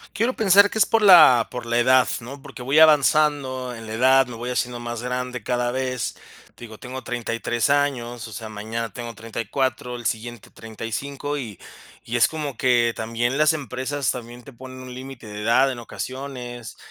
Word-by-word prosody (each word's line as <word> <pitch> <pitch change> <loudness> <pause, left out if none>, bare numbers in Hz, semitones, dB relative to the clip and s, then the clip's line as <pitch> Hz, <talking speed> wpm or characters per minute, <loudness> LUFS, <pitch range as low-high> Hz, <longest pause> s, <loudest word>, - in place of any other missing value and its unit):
Quiero 235 +4 +1
pensar 200 -1 +5
que 220 - -4
es - - +6
por 225 -1 +2
la 155 - +8
por 125 -1 -6
la 120 +1 +1
edad, 130 +1 +4
¿no? 135 +4 -9
Porque 135 -3 -10
voy 140 +5 +3
avanzando 145 -4 +3
en 115 0 -10
la 110 - -6
edad, 130 +2 +4
me 120 - -8
voy 120 +2 -5
haciendo 125 -1 -2
más 120 0 -5
grande 125 -2 -4
cada 120 -1 -1
vez. 130 -2 -3 0.4
Te - - -14
digo, 110 -2 -10
tengo 130 0 -7
33 120 +1 -2
años, 120 -5 0
o 110 - -11
sea, 110 +2 -7
mañana 110 +2 -5
tengo 120 -1 -7
34, 120 +3 -3
el 120 -1 -9
siguiente 115 0 -5
35, 135 +6 -5
y 110 -8 -7 0.4
y 115 - -5
es 120 0 +5
como 150 -5 -5
que 120 -2 +2
también 115 +4 -2
las 155 +1 +4
empresas 140 -1 -2
también 120 -1 -8
te 140 - -13
ponen 130 +1 -11
un 130 -1 -9
límite 130 -3 -9
de 105 0 -7
edad 130 +4 +3
en 120 - -6
ocasiones. 125 -1 -7
125 Hz, 190 wpm, -23 LUFS, 115-135 Hz, 0.4 s, la